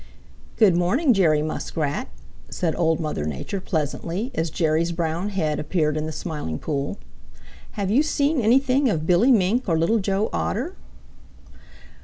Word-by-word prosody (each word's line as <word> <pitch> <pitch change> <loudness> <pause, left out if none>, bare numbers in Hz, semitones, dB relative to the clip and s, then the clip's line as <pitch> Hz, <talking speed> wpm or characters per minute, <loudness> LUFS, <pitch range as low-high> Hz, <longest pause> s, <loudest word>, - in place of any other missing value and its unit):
"Good 200 -6 +5
morning, 240 - +3
Jerry 155 -7 +3
Muskrat," 155 -1 -3 0.4
said 165 -3 -2
Old 165 -2 +1
Mother 155 - -3
Nature 75 - -4
pleasantly, 170 - -3
as 165 -8 -1
Jerry's 160 +1 +1
brown 170 +3 -2
head 160 -7 -1
appeared 150 -1 0
in 155 0 -2
the - - -4
Smiling 150 - -4
Pool. 145 - -3 0.8
"Have 200 -3 -2
you 255 +7 +4
seen 295 -2 +1
anything 260 +4 +3
of 160 -6 -1
Billy 185 +10 +4
Mink 220 +1 +2
or 165 - +2
Little 195 +8 +2
Joe 195 +1 -1
Otter?" 265 - -2
175 Hz, 145 wpm, -23 LUFS, 155-220 Hz, 0.8 s, Good